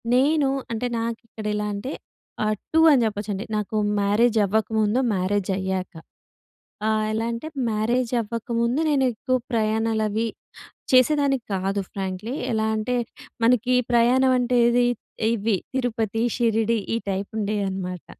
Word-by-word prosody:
నేను 280 +2 +3 0.2
అంటే 230 +2 -1
నాకు 230 0 -3
ఇక్కడ 220 -2 -9
ఎలా 210 0 -1
అంటే 230 +8 -5 0.5
ఆహ్, 215 0 +1 0.2
2 320 - +5
అని 260 - +4
చెప్పొచ్చండి. 205 -1 -3
నాకు 210 +1 -3 0.3
మ్యారేజ్ 220 +3 +3
అవ్వకముందు, 220 +2 +1
మ్యారేజయ్యాక. 190 -1 -1 1.0
ఆహ్, 215 0 +1
ఎలా 225 +1 -1
అంటే, 230 +7 -5 0.2
మ్యారేజ్ 230 +3 0
అవ్వకముందు 235 +4 -1
నేను 275 -3 +2
ఎక్కువ 255 +3 -1 0.2
ప్రయాణాలు 220 0 +1
అవి 220 +2 -1 0.7
చేసేదాన్ని 275 +2 +4 0.2
కాదు 195 +1 -1
ఫ్రాంక్లీ. 195 +5 -4 0.2
ఎలా 220 -1 +1
అంటే, 220 +3 -1 0.5
మనకి 250 +1 +3 0.2
ప్రయాణం 250 +2 +4
అంటే 245 0 +1
ఏది, 245 +1 +3 0.5
ఇవి 220 -2 +1 0.2
తిరుపతి, 225 -4 -1 0.2
షిరిడి 230 -1 +2 0.2
ఈ - - +1
టైప్ 195 +1 -2
ఉండే 210 0 -1
అనమాట. 180 -2 -5
225 Hz, 130 wpm, -24 LUFS, 205-245 Hz, 1.0 s, 2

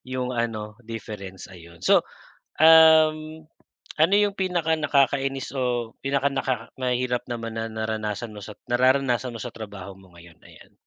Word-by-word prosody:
yung 130 0 -3
ano 110 -3 -3
difference, 105 -4 -8
ayun. 85 -2 -14
So, - - +4 0.6
um, 160 -1 +6 0.6
ano 165 +6 +5
yung 205 -1 +3
pinaka 175 -4 0
nakakainis 135 -2 0
o 120 -3 -1
pinaka 140 0 +1
naka 135 -1 0 0.3
mahirap 125 -1 -1
naman 115 -1 -5
na 115 - -3
naranasan 110 0 -4
mo 105 - -9
sa 105 - -10
nararanasan 125 0 +1
mo 115 - -7
sa 120 - -6
trabaho 105 -4 -8
mo 95 -2 -19
ngayon? 85 -1 -16
Ayan. - - -17
125 Hz, 145 wpm, -24 LUFS, 110-140 Hz, 0.6 s, um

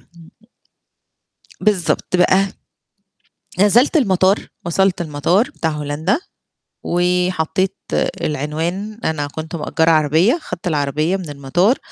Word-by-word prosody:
امم. 165 -1 -15 1.3
بالضبط 190 -3 +1
بقى، 190 +2 +4 1.1
نزلت 230 - +4
المطار 195 - +2 0.2
وصلت 190 +2 +1
المطار 170 - +1
بتاع 165 - -2
هولندا 150 - -1 0.7
وحطيت 180 +1 0 0.4
العنوان، 165 - -3
أنا 150 -2 -1
كنت 160 +3 -6
مأجّرة 160 +1 +1
عربية 160 - +3
خدت 180 0 -7
العربية 155 +2 0
من 185 -4 -7
المطار 145 - +1
175 Hz, 95 wpm, -19 LUFS, 155-195 Hz, 1.3 s, بقى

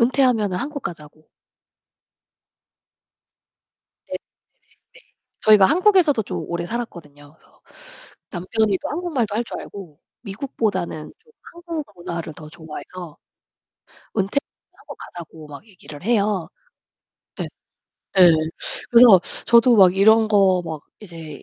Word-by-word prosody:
은퇴하면은 235 -6 +2
한국 285 +7 -5
가자고. 155 -2 -9 2.8
네. - - -14
네. - - -1 1.2
저희가 210 -3 +6
한국에서도 350 - +3
좀 - - -5
오래 170 0 -3
살았거든요. 155 -11 -8
그래서 - - -28 0.7
남편이 200 +2 0
또 - - -3
한국말도 285 - -2
할 235 - 0
줄 - - -7
알고 175 -7 -11 0.2
미국보다는 200 - -3
좀 460 - -27 0.2
한국 340 -3 -6
문화를 170 -2 -6
더 155 -1 -11
좋아해서 160 0 -10 1.0
은퇴하고 200 +8 -4
가자고 165 -2 -11
막 145 +9 -11
얘기를 180 -6 -13
해요. 205 -6 +1 0.9
예. - - -3 0.7
예. 180 -2 +9 0.6
그래서 230 -6 +8 0.3
저도 235 0 +5
막 185 -2 +6
이런 220 +2 +5
거 195 -4 +3
막 160 -3 -6 0.2
이제 165 -7 -10
195 Hz, 240 characters per minute, -21 LUFS, 170-235 Hz, 2.8 s, 예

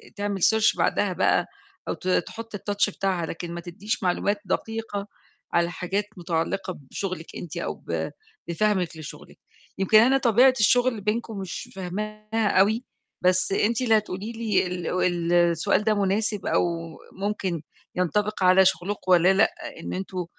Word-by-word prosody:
تعمل 205 -1 -3
search 220 -1 +4
بعدها - - +1
بقى - - +2 0.4
أو - - 0
ت 185 - -8
تحُط 220 +5 -1
الtouch 205 0 0
بتاعها، 185 -3 0
لكن 170 +1 -6
ما 170 - -5
تدّيش 205 +7 -4
معلومات 200 +3 +1
دقيقة 210 0 -3 0.5
على 170 0 +2
حاجات 190 +3 -2
مُتعلقة 175 +2 -2
بشغلِك 185 -4 -5
أنتِ 170 - -7
أو - - -2
ب - - -4 0.4
بفهمِك 180 -1 0
لشغلِك. 155 -2 -10 0.4
يمكن 195 +3 +4
أنا 260 +4 +5
طبيعة 250 +1 +5
الشغل 245 0 +3
بينكم 215 +1 -2
مش 190 -3 -6
فاهماها 215 +4 -3
أوي، 220 +5 +3 0.4
بس 185 +1 +2
أنتِ 225 +5 +1
اللي 225 -3 +4
هتقولي 210 +1 -4
لي 220 -5 0 0.4
ال 175 -1 -1
السؤال 170 +3 +3
ده 215 0 +3
مناسب 205 0 0
أو - - +2 0.5
ممكن 190 -4 -3 0.3
ينطبق 200 +3 0
على 185 +1 +6
شغلكم 185 +1 0
والَّا 180 +1 +6
لأ، 200 +3 +3 0.3
إن - - -5
أنتم، 185 -1 -4
195 Hz, 145 wpm, -25 LUFS, 180-215 Hz, 0.5 s, على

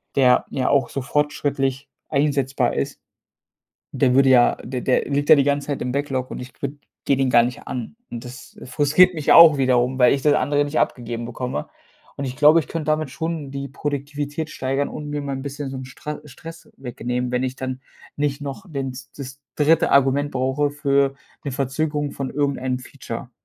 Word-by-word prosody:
der 125 -2 +4
ja 130 - 0
auch 135 -4 +2
so 135 - -4
fortschrittlich 140 -1 -1 0.2
einsetzbar 140 -4 +1
ist. 70 - -3 0.9
Der 125 - +2
würde 135 0 +5
ja 125 -2 +5
der 125 0 -4
der 130 - +1
liegt 145 +1 0
ja - - +11
die 140 - +3
ganze 145 0 0
Zeit 145 - -2
im 125 - -2
Backlog 135 -2 -2
und - - -6
ich 125 0 -10
würde 140 +1 -3 0.3
gehe 140 - +3
den 135 -1 +1
gar 120 - +6
nicht 120 +1 -4
an. 125 - -5
Und 120 0 -7
das, 125 +2 -11
äh, - - -9
frustriert 150 +8 +4
mich 155 -3 +2
auch 165 -3 +9
wiederum, 130 -1 +2
weil 125 - +6
ich 140 - -2
das 150 0 +4
andere 145 +2 +2
nicht 145 +2 -2
abgegeben 120 -1 -2
bekomme. 125 - -4 0.5
Und 140 - -4
ich 130 0 -5
glaube, 150 +3 +6
ich 140 - -9
könnte 165 -2 -4
damit 155 -2 0
schon 160 -1 -4
die 140 0 -5
Produktivität 145 +2 -4
steigern 135 0 -2
und 150 -1 -7
mir 145 0 -2
mal 140 -1 -4
'n 135 - -6
bisschen 140 0 -5
so 135 - -6
'n 130 - -6
Stra 150 +3 -7
Stress 165 +4 -12
wegnehmen, 125 -1 -3
wenn 125 0 0
ich 130 0 -3
dann 130 0 -5 0.4
nicht 145 -1 -1
noch 145 +6 -6
den 135 -3 -3
s 125 0 -11
das 135 0 -8 0.2
3. 155 +2 +3
Argument 140 +1 +3
brauche 130 +2 0
für 140 -1 +1 0.3
'ne 140 - -2
Verzögerung 145 +2 -2
von 135 -2 -4
irgendeinem 135 -3 -1
Feature. 125 -1 -8
140 Hz, 200 wpm, -22 LUFS, 130-145 Hz, 0.9 s, ja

